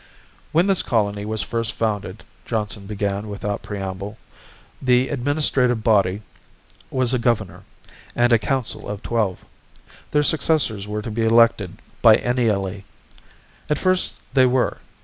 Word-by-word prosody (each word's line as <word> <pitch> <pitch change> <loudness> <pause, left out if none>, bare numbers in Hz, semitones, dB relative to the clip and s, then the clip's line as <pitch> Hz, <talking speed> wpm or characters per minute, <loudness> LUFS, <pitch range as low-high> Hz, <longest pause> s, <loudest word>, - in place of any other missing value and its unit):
"When 170 +3 +3
this 195 -2 +2
colony 105 -3 0
was 110 -2 -1
first 115 +2 -2
founded," 105 -2 -3 0.2
Johnson 105 -3 -3
began 100 0 -2
without 100 0 -3
preamble, 100 +1 -5 0.6
"the 125 0 +3
administrative 135 -4 +1
body 105 -2 +2 0.7
was 130 -1 +1
a 125 - +2
governor, 100 -6 -1 0.5
and 120 0 +3
a 115 - +6
council 130 -1 -2
of 105 -1 -5
twelve. 110 -6 -1 0.6
Their 150 0 +2
successors 140 -9 +1
were 105 0 -3
to 110 - -5
be 115 +2 -2
elected 115 -4 +3 0.2
biennially. 110 -4 +3 0.9
At 150 - +2
first 185 -1 +1 0.2
they 130 -2 +5
were. 125 0 +1
110 Hz, 130 wpm, -22 LUFS, 100-125 Hz, 0.9 s, a